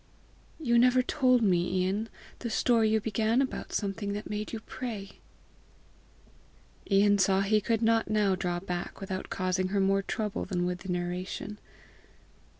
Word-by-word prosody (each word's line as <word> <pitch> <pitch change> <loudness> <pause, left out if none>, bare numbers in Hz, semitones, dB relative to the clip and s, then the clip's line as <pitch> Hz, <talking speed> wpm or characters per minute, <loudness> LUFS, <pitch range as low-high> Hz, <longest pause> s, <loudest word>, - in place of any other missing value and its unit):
"You 235 -6 +3
never 250 +1 +5
told 255 -3 +3
me, 180 -1 +2
Ian, 205 +4 -1 0.3
the 235 - -4
story 225 0 +3
you 220 0 +3
began 220 +2 +1
about 270 -1 -2
something 200 0 -2
that 210 +1 -5
made 210 0 -3
you 225 - -4
pray!" 220 -7 -7 1.7
Ian 200 0 +4
saw 190 0 +3
he 210 +2 +2
could 225 +2 0
not 225 0 +2
now 210 -2 +2
draw 180 -2 -1
back 175 -1 -5
without 190 -1 -5
causing, 185 0 0
her 200 +2 0
more 195 0 +3
trouble 210 +1 -3
than 175 -3 -1
would 180 0 -2
the 190 - -10
narration. 180 +4 -4
205 Hz, 150 wpm, -29 LUFS, 185-225 Hz, 1.7 s, never